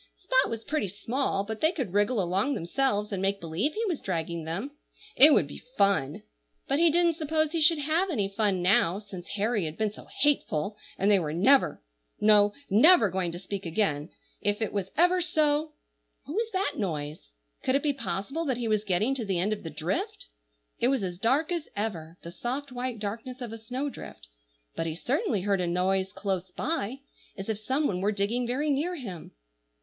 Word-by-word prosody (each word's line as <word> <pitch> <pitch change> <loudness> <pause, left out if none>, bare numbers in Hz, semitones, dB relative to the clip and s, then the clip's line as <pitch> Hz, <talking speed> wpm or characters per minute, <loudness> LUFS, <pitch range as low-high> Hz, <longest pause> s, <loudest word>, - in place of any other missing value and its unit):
Spot 260 -7 +2
was 230 -1 -4
pretty 300 -6 -1
small, 205 +3 -1
but 220 +1 -6
they 315 - +4
could 265 - -4
wriggle 205 +3 +2
along 190 +9 +1
themselves, 210 +3 0
and 195 -2 -2
make 195 +1 0
believe 170 - -1
he 450 +2 -1
was 350 -8 -2
dragging 170 -2 -3
them. 195 - -4 0.4
It 295 +3 +9
would 170 - +5
be 145 - -10 0.2
fun! 195 -9 +2 0.4
but 275 - +1
he 335 0 +6
didn't 340 0 +3
suppose 310 -1 0
he 330 -1 -1
should 330 +1 +6
have 315 +6 +1
any 210 - 0
fun 195 -3 0
now, 180 -1 +3
since 200 -4 -9
Harry 210 -2 0
had 155 0 -5
been 215 -1 0
so - - -13
hateful, 215 - +1 0.2
and 200 +2 +3
they 200 - +5
were 155 -3 -3
never—no, 205 - +3 0.2
never 225 - +6
going 185 -2 -1
to 170 - -6
speak 195 +2 -5
again, 165 -4 -1 0.3
if 205 +1 +1
it 220 - -2
was 195 -2 -2
ever 355 +2 +4
so— 305 -2 +1 0.5
What 290 - -7
was 450 +4 0
that 380 -6 -1
noise? 150 - -4 0.3
Could 260 - +1
it 275 - +1
be 295 -2 +2
possible 265 - -3
that 260 -5 0
he 240 -2 -2
was 215 -1 +1
getting 210 +6 +1
to 265 -3 -3
the 195 -4 -1
end 195 +5 +1
of 210 - -6
the 165 - -6
drift? 155 +5 -3 0.5
It 240 - +3
was 265 -5 +1
as 180 -1 -4
dark 275 - +2
as 340 -3 -3
ever,—the 170 -5 -5
soft, 260 +8 -4
white 250 -1 -3
darkness 225 +5 -5
of 240 -3 -6
a - - -6
snowdrift; 250 - -6 0.5
but 165 - -2
he 160 - -3
certainly 245 - 0
heard 195 -1 +1
a 175 - -1
noise 190 +2 +1
close 190 -2 -3
by, 275 -4 -2 0.4
as 195 +2 -6
if 215 -2 -1
some 265 +7 0
one 180 -8 0
were 205 +2 +2
digging 215 +4 -1
very 290 +5 0
near 315 +6 0
him. 195 - -8
215 Hz, 195 wpm, -28 LUFS, 185-275 Hz, 0.5 s, It